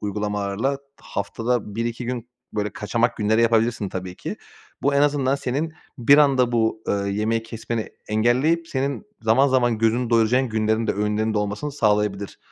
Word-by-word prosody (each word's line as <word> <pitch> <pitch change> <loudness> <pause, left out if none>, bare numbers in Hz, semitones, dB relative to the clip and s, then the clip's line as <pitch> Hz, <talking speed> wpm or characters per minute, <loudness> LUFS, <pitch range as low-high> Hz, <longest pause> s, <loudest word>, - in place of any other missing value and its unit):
uygulamalarla. 105 +5 -2 0.2
Haftada 115 +1 -2
1-2 115 +1 -3
gün 120 -1 -4 0.2
böyle 105 -1 -1
kaçamak 115 +3 0
günleri 110 +2 +2
yapabilirsin 115 -2 +2
tabii 90 -1 -6
ki. - - -5 0.5
Bu 140 0 +2
en 140 - +4
azından 140 -2 +2
senin 140 +4 -2 0.3
bir 140 +5 +6
anda 130 -4 +4
bu, 110 -1 +1
ııı, 100 0 0
yemeği 110 +3 0
kesmeni 115 0 -4 0.2
engelleyip 130 +10 +2
senin 140 +5 -2 0.2
zaman 120 +6 +4
zaman 120 -3 +2
gözünü 115 +2 +1
doyuracağın 120 +3 +3
günlerin 110 +1 0
de - - +1
öğünlerinde 105 +1 0
olmasını 105 +8 -3
sağlayabilir. 105 -5 0
115 Hz, 150 wpm, -23 LUFS, 105-130 Hz, 0.5 s, bir